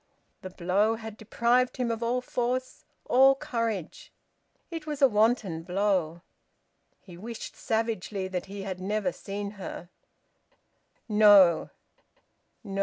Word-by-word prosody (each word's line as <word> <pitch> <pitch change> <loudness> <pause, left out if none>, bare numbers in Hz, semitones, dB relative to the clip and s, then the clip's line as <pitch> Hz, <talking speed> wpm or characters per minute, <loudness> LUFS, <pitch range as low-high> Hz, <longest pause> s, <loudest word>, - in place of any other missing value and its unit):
The 185 - -7
blow 190 +5 +1
had 220 -1 -8
deprived 235 +3 +1
him 245 -2 -1
of 225 0 -4
all 240 +2 0
force, 250 +1 -3 0.2
all 270 +2 +5
courage. 230 -9 -4 0.6
It 325 -2 -6
was 295 -2 -4
a 275 - +7
wanton 215 -6 +1
blow. 180 -2 0 0.8
He 175 -3 -14
wished 225 +5 -8
savagely 220 -4 -2
that 185 -1 -4
he 200 0 -7
had 190 -2 -5
never 210 +7 -1
seen 200 -2 -6
her... 175 -1 -7 1.2
No! 205 -5 +6 0.9
no! 195 -2 -5
215 Hz, 120 wpm, -27 LUFS, 190-235 Hz, 1.2 s, a